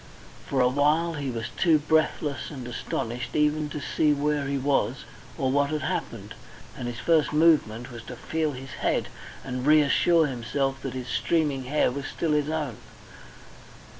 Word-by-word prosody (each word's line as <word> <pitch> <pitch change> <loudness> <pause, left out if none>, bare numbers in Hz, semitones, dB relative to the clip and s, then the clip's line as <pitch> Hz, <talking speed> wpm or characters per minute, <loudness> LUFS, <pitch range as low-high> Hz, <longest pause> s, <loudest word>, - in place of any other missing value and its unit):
For 135 -2 +1
a 125 - +5
while 150 +6 +2
he 145 -3 -3
was 115 -2 -4
too 165 -4 +4
breathless 150 -1 0
and 130 -4 -7
astonished 120 0 -4
even 150 0 +2
to 150 - -5
see 150 +1 +1
where 145 0 0
he 140 0 -1
was 135 +1 0 0.3
or 130 -1 0
what 140 +1 +2
had 155 -2 -2
happened. 110 -4 -4 0.4
And 125 - -5
his 120 -1 -5
first 160 +2 +2
movement 145 -7 +3
was 120 -1 -8
to 125 - -7
feel 155 +4 -2
his 130 0 -9
head - - 0 0.3
and 125 -1 -4
reassure 155 +3 +4
himself 135 +1 -2
that 135 - -4
his 130 -1 -5
streaming 145 -3 0
hair 140 -1 +2
was 140 +1 -5
still 165 - -2
his 150 0 +1
own. 150 -8 -2
140 Hz, 165 wpm, -26 LUFS, 125-150 Hz, 0.4 s, a